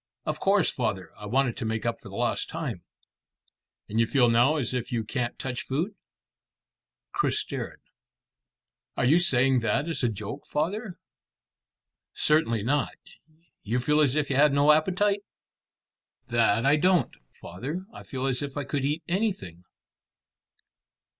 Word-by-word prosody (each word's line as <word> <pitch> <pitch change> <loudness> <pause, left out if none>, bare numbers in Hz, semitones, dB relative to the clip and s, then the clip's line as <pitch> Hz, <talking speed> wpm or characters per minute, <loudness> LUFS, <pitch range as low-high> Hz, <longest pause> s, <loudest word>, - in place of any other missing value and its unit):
"Of 155 0 -2
course, 195 -3 +3
father. 110 -7 -3
I 105 - -9
wanted 125 +1 +1
to - - -4
make 110 0 -2
up 115 -1 -1
for 100 - -12
lost 115 +4 -1
time." 140 - -4 1.1
"And 110 - -1
you 115 - +4
feel 125 -1 +4
now 120 +6 +4
as 130 -5 -2
if 125 -2 -3
you 115 -2 0
can't 120 +2 -3
touch 125 -2 -4
food?" 160 +10 -1 1.2
Chris - - +1
stared. - - -5 1.2
"Are - - +2
you 155 +7 +5
saying 135 -5 +3
that 135 +6 0
as 165 - -2
a 120 - +2
joke, 110 +6 -6
father?" 185 +6 -2 1.2
"Certainly 115 -9 +2
not. 140 +5 0 0.7
You 115 +4 -1
feel 150 +5 +2
as 140 -2 +3
if 150 -2 0
you 135 - +1
had 150 0 +5
no 145 +2 +5
appetite?" 190 +6 +2 1.1
"That 115 -1 +3
I 145 +2 +5
don't, 180 +2 +3 0.3
father. 140 - -6
I - - -9
feel 130 0 -5
as 130 0 0
if 140 0 -5
I 145 - -1
could 140 -1 -2
eat 150 +4 -1
anything." 175 - -2
135 Hz, 150 wpm, -27 LUFS, 115-155 Hz, 1.2 s, you